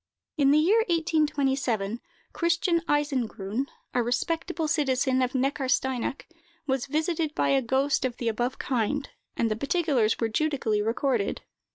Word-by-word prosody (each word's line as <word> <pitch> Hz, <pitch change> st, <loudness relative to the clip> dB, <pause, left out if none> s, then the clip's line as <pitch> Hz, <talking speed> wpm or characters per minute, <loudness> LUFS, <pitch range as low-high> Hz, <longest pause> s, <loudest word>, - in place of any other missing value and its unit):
In 280 Hz, -3 st, +3 dB
the 290 Hz, -, +5 dB
year 370 Hz, +9 st, +4 dB
1827, 275 Hz, -, 0 dB, 0.3 s
Christian 340 Hz, 0 st, +1 dB
Eisengrun, 260 Hz, -5 st, -1 dB, 0.3 s
a 245 Hz, -, +2 dB
respectable 320 Hz, +7 st, -1 dB
citizen 265 Hz, -3 st, +1 dB
of 255 Hz, 0 st, 0 dB
Neckarsteinach, 265 Hz, -1 st, 0 dB, 0.4 s
was 265 Hz, -2 st, -1 dB
visited 315 Hz, +1 st, -1 dB
by -, -, +1 dB
a 275 Hz, -1 st, +3 dB
ghost 265 Hz, +4 st, +1 dB
of 250 Hz, -2 st, -2 dB
the 235 Hz, -, -3 dB
above 240 Hz, +3 st, -1 dB
kind, 265 Hz, +3 st, -1 dB, 0.3 s
and 230 Hz, -1 st, +1 dB
the -, -, +1 dB
particulars 275 Hz, -4 st, +1 dB
were 230 Hz, -, +1 dB
judically 225 Hz, -4 st, 0 dB
recorded. 230 Hz, 0 st, 0 dB
270 Hz, 135 wpm, -27 LUFS, 240-305 Hz, 0.4 s, the